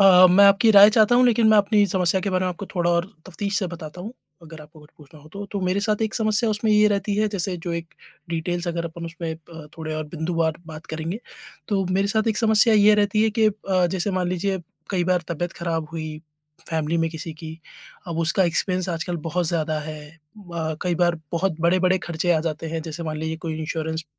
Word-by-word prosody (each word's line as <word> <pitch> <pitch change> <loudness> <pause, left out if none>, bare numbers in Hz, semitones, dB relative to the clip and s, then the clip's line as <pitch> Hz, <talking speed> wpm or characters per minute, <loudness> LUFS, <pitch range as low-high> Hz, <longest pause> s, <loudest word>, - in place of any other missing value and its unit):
अ, 185 -2 +8
मैं 195 +3 +6
आपकी 200 +3 +5
राय 205 0 +9
चाहता 220 +2 +4
हूँ 250 - +5
लेकिन 230 -2 +3
मैं 215 - +6
अपनी 205 0 +3
समस्या 185 -1 +1
के 200 - -2
बारे 185 0 0
में 185 - 0
आपको 180 +3 -7
थोड़ा 175 -1 +1
और 170 +1 +1 0.2
तफ़्तीश 200 +2 -2
से 190 - -1
बताता 170 -1 -8
हूँ, 215 +6 -7 0.3
अगर 160 -1 -11
आपको 150 +1 -16
कुछ 150 0 -18
पूछना 150 +1 -16
हो 155 - -16
तो, 200 +4 -7
तो 200 0 -5
मेरे 185 +2 0
साथ 215 +1 0
एक 220 0 -2
समस्या 220 0 +1
उसमें 215 +1 0
ये 210 0 +5
रहती 200 0 -1
है, 215 0 +2
जैसे 190 -2 -2
जो 170 0 -5
एक 170 -1 -6 0.3
डिटेल्स 175 +1 -2
अगर 170 0 -2
अपन 170 +1 -7
उसमें 165 -1 -5
अ, 160 -1 -13
थोड़े 155 -1 -4
और 155 0 -3
बिंदुवार 160 0 -1
बात 160 0 -10
करेंगे, 160 +7 -5 0.5
तो 195 -2 +1
मेरे 195 +2 +1
साथ 220 +2 +1
एक 220 - 0
समस्या 220 0 +4
ये 210 0 +6
रहती 210 +1 +2
है 220 - +2
कि 220 - +5
अ, 195 -3 0
जैसे 185 +3 -2
मान 185 -2 -1
लीजिए 190 +2 -1 0.3
कई 180 -3 0
बार 180 -1 +1
तबीयत 175 +1 -3
खराब 165 -2 -3
हुई 155 -1 -6 0.5
फैमिली 160 0 -1
में 165 - +1
किसी 160 0 -7
की, 160 0 -9 0.5
अब 165 -1 -4
उसका 170 +3 +2
एक्सपेन्स 185 +2 0
आजकल 170 0 -3
बहुत 175 +2 -1
ज़्यादा 155 -2 -1
है 155 0 -7
अ, 165 0 -7
कई 180 -1 0
बार 175 0 +2 0.2
बहुत 170 -1 0
बड़े-बड़े 185 +2 +3
खर्चे 170 +1 0
आ 160 - +2
जाते 160 0 -4
हैं, 165 0 -4
जैसे 160 +1 -6
मान 155 -1 -4
लीजिए 160 +1 -3
कोई 160 -1 -3
इन्श्योरेंस 160 0 -3
175 Hz, 225 wpm, -23 LUFS, 160-200 Hz, 0.5 s, राय